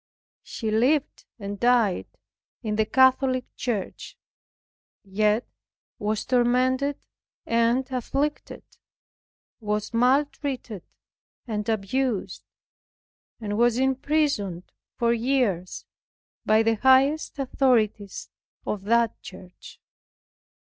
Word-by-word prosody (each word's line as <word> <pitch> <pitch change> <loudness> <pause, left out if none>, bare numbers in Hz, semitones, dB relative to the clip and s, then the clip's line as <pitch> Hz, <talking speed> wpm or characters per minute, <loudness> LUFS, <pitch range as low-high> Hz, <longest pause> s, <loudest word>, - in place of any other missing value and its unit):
She 220 -1 -5
lived 260 +7 +1
and 200 -2 -6
died 240 -6 +2 0.6
in 215 -2 -2
the 215 0 +1
Catholic 260 +1 +3
Church; 220 -7 -4 0.9
yet 210 +3 +1 0.5
was 210 +1 -2
tormented 255 +3 +1 0.5
and 235 +3 +1
afflicted; 275 +4 -3 1.0
was 210 0 -3
maltreated 255 - 0 0.6
and 210 -2 -3
abused; 225 +1 -1 1.0
and 210 -1 -3
was 240 0 +3
imprisoned 265 - 0 0.2
for 235 0 +2
years 230 -7 -1 0.6
by 215 +1 +4
the 225 0 +1
highest 265 +6 +3
authorities 240 -7 0 0.3
of 200 -2 -4
that 230 +1 +1
church. 185 -1 -13
235 Hz, 85 wpm, -25 LUFS, 210-260 Hz, 1.0 s, by